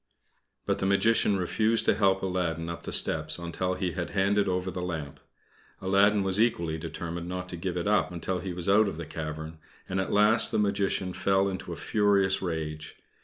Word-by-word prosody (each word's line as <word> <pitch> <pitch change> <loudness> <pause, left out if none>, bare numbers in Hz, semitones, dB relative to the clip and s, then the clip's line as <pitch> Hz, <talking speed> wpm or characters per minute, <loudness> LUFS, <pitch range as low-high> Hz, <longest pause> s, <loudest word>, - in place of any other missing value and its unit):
But - - 0
the 95 - 0
Magician 105 0 +3
refused 110 +5 +1
to - - +4
help 95 -2 +2
Aladdin 85 -3 -2
up 85 - -6
the - - -6
steps 80 -1 +1
until 90 +2 -3
he 90 -1 -2
had 85 0 -4
handed 100 0 +1
over 90 0 -1
the 90 - -5
lamp. 80 -5 -5 0.6
Aladdin 100 +2 +3
was 95 +2 +2
equally 85 -9 0
determined 85 +1 -5
not 90 0 -4
to 90 - -5
give 90 +1 -3
it 85 - -2
up 105 -2 +2
until 90 +2 -3
he 95 +1 -5
was 90 0 -5
out 105 +2 +5
of 95 - -4
the 85 - -5
cavern, 80 0 -6 0.3
and, 95 +1 -2
at 95 - -4
last, 105 +3 +4
the - - 0
Magician 100 -2 0
fell 95 +1 +2
into 95 -2 -5
a - - -4
furious 100 -2 +2
rage. 80 -3 -4
95 Hz, 195 wpm, -28 LUFS, 85-100 Hz, 0.6 s, out